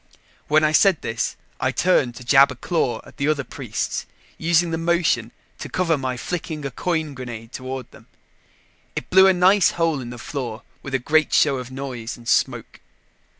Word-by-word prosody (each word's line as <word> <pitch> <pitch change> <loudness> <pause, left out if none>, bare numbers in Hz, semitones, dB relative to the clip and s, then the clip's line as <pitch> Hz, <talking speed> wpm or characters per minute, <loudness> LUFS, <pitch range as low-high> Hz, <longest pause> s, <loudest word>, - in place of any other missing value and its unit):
When 155 +1 +4
I 155 - +3
said 190 +1 +4
this, 115 0 -2 0.2
I - - +1
turned 145 -9 +2
to 125 - -10
jab 135 +3 +6
a 130 - -6
claw 125 -5 -1
at - - -16
the 140 - -1
other 150 -2 +1
priests, - - -4 0.3
using 170 +1 +2
the 165 - -1
motion 170 0 +1 0.3
to - - -6
cover 175 -3 +1
my 130 -3 -3
flicking 155 0 -4
a 140 - -3
coin 160 0 -2
grenade 120 -3 -8
toward 130 -1 -6
them. - - -17 0.9
It - - -5
blew 190 +1 +7
a - - +7
nice 185 +2 +5
hole 165 -5 +1
in 120 - -7
the 120 - -8
floor 120 -2 -5 0.2
with 135 -1 -4
a - - +4
great 155 +5 +2
show 140 -3 +4
of 125 -1 -6
noise 130 -3 -6
and 120 -1 -14
smoke. - - 0
140 Hz, 190 wpm, -22 LUFS, 125-165 Hz, 0.9 s, blew